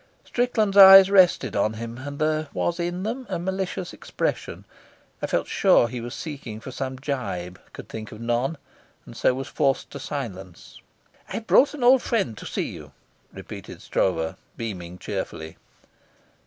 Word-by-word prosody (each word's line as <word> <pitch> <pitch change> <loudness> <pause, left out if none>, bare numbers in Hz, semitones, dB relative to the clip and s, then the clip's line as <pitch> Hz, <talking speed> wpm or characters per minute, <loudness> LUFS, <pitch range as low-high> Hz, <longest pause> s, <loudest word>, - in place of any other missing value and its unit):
Strickland's 220 -5 0
eyes 195 0 +10
rested 180 - +4
on 105 +2 +1
him, 115 +2 -7
and 145 +1 -7
there 155 0 0
was 175 0 -1
in 175 +2 -2
them 240 +4 -4
a 185 - -1
malicious 185 0 -3
expression. - - -4 0.6
I - - -1
felt - - 0
sure 120 - +4
he 120 0 -6
was 120 +2 -6
seeking 135 -8 -7
for 130 - -9
some 130 0 -4
gibe, 100 -11 -4
could - - -10
think 110 -1 -8
of 110 - -10
none, 120 +6 -1 0.5
and - - -12
so 125 - +2
was 135 +1 -5
forced 135 -3 0
to - - -7
silence. 95 -10 -7 0.5
"I've 225 - -5
brought 280 +6 +4
an 275 - -5
old 255 +1 +6
friend 195 - -1
to - - -8
see - - -2
you," - - -11 0.4
repeated - - -10
Stroeve, 80 -3 -1 0.2
beaming 90 -6 -6
cheerfully. 80 -3 -6
135 Hz, 160 wpm, -24 LUFS, -, 0.6 s, eyes